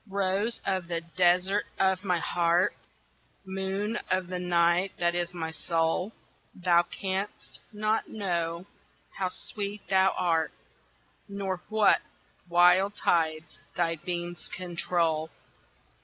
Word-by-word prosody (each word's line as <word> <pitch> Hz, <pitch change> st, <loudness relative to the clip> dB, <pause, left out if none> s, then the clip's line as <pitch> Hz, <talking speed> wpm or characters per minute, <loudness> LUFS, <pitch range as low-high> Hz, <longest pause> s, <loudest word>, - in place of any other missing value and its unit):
ROSE 200 Hz, +4 st, 0 dB
of 190 Hz, -3 st, -1 dB
the 170 Hz, -1 st, -1 dB, 0.2 s
desert 185 Hz, +3 st, +3 dB
of 190 Hz, 0 st, +2 dB
my 180 Hz, -3 st, +1 dB
heart, 170 Hz, +1 st, +2 dB, 0.7 s
Moon 190 Hz, +3 st, -2 dB
of 185 Hz, -1 st, 0 dB
the 180 Hz, -1 st, -3 dB
night 175 Hz, +1 st, +2 dB
that 175 Hz, 0 st, +1 dB
is 175 Hz, 0 st, -1 dB
my 165 Hz, -2 st, -4 dB
soul, 165 Hz, +4 st, 0 dB, 0.4 s
Thou 175 Hz, -2 st, +4 dB
can'st 190 Hz, +3 st, -4 dB
not 215 Hz, +1 st, 0 dB
know 170 Hz, -4 st, -2 dB, 0.5 s
how 185 Hz, -1 st, 0 dB
sweet 205 Hz, +1 st, -5 dB
thou 190 Hz, 0 st, +4 dB
art, 165 Hz, -3 st, +1 dB, 0.8 s
Nor 195 Hz, -2 st, -3 dB
what 215 Hz, -1 st, +4 dB, 0.5 s
wild 180 Hz, +4 st, +5 dB
tides 160 Hz, -1 st, 0 dB, 0.2 s
thy 165 Hz, -1 st, +1 dB
beams 175 Hz, +1 st, -5 dB
control. 170 Hz, -3 st, -1 dB
180 Hz, 110 wpm, -28 LUFS, 170-195 Hz, 0.8 s, wild